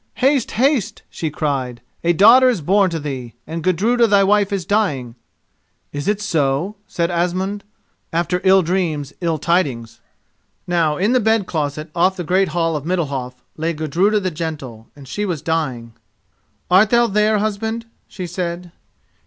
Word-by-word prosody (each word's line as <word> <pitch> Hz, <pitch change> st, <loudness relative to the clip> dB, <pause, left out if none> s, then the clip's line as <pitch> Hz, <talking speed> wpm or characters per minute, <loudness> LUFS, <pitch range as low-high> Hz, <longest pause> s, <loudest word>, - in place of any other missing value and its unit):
"Haste, 270 Hz, -1 st, +2 dB
haste!" 240 Hz, -5 st, +1 dB
she 160 Hz, -, -3 dB
cried; 135 Hz, -5 st, -2 dB, 0.2 s
"a 170 Hz, -, +3 dB
daughter 230 Hz, +9 st, +7 dB
is 230 Hz, -9 st, -1 dB
born 195 Hz, +5 st, +3 dB
to 165 Hz, -2 st, -3 dB
thee, 130 Hz, -6 st, -6 dB
and 165 Hz, +1 st, -5 dB
Gudruda 225 Hz, +7 st, +2 dB
thy 200 Hz, -2 st, +4 dB
wife 205 Hz, 0 st, +2 dB
is 195 Hz, -4 st, -2 dB
dying!" 150 Hz, -, 0 dB, 0.8 s
"Is 145 Hz, 0 st, -4 dB
it 210 Hz, 0 st, +1 dB
so?" 165 Hz, -1 st, 0 dB
said 170 Hz, 0 st, -1 dB
Asmund; 185 Hz, +4 st, -1 dB, 0.5 s
"after 170 Hz, +2 st, 0 dB
ill 190 Hz, 0 st, +5 dB
dreams 160 Hz, -5 st, -1 dB
ill 165 Hz, -2 st, 0 dB
tidings." 140 Hz, -9 st, -1 dB, 0.6 s
Now 165 Hz, -4 st, +1 dB
in 205 Hz, +5 st, +1 dB
the 255 Hz, -, +4 dB
bed 220 Hz, -2 st, +2 dB
closet 155 Hz, -2 st, -3 dB
off 185 Hz, +3 st, +2 dB
the 180 Hz, -, -3 dB
great 185 Hz, +4 st, +2 dB
hall 165 Hz, 0 st, -1 dB
of 145 Hz, -, -3 dB
Middalhof 140 Hz, -8 st, -3 dB
lay 165 Hz, +2 st, -1 dB
Gudruda 170 Hz, +8 st, +1 dB
the 185 Hz, -2 st, -2 dB
Gentle 150 Hz, -9 st, -6 dB
and 140 Hz, -2 st, -13 dB
she 210 Hz, -, -3 dB
was 175 Hz, -8 st, -3 dB
dying. 130 Hz, -8 st, -2 dB, 0.8 s
"Art 195 Hz, +4 st, +6 dB
thou 235 Hz, +1 st, +4 dB
there, 210 Hz, 0 st, +2 dB
husband?" 220 Hz, +2 st, -2 dB, 0.2 s
she 185 Hz, -, -7 dB
said. 175 Hz, 0 st, -4 dB
175 Hz, 160 wpm, -19 LUFS, 150-205 Hz, 0.8 s, daughter